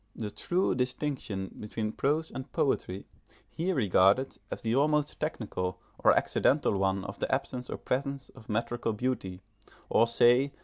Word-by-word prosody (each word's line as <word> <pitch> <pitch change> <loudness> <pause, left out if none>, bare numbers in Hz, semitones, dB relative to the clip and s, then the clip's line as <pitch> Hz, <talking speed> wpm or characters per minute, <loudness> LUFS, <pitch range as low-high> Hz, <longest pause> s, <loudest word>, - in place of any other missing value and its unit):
The 105 -2 -4
true 180 - 0
distinction 125 -6 -3
between 105 0 -3
prose 155 +7 0
and 130 +1 -7
poetry 100 -8 0 0.5
he 175 +4 -1
regarded 105 - +3
as - - -6
the 115 +1 +1
almost 150 +1 +2
technical 105 - -3 0.2
or - - +5
accidental 140 -6 +2
one 95 0 +1
of 100 0 -7
the - - -2
absence 130 -2 -2
or - - -3
presence 140 +1 -2
of 120 -4 -16
metrical 115 +1 -1
beauty, 105 -6 -3 0.5
or, 115 - +5
say! 125 +4 +4
125 Hz, 145 wpm, -30 LUFS, 105-140 Hz, 0.5 s, or